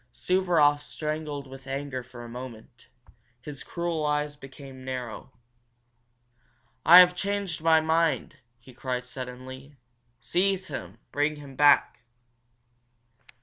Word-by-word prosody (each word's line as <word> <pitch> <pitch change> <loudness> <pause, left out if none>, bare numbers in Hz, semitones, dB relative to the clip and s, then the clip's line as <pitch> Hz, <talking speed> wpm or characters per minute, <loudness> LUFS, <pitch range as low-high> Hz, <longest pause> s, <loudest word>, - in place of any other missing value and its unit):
Suvaroff 170 -6 +2
strangled 150 -2 -4
with 135 0 -12
anger 135 -1 -4
for 125 -1 -11
a - - -8
moment. 120 0 -10 0.5
His 140 +2 -8
cruel 170 -2 -3
eyes 150 0 0
became 135 -2 -12
narrow. 130 -1 -6 1.5
"I 170 +4 +9
have 180 0 +8
changed 200 -3 -2
my 160 0 +5
mind!" 160 0 +1 0.2
he 125 +2 -16
cried, 125 0 -4
suddenly. 130 +2 -9 0.4
"Seize 190 +6 0
him! 100 - -7
Bring 145 +1 0
him 140 -2 -11
back!" 145 -2 +4
145 Hz, 110 wpm, -27 LUFS, 130-160 Hz, 1.5 s, I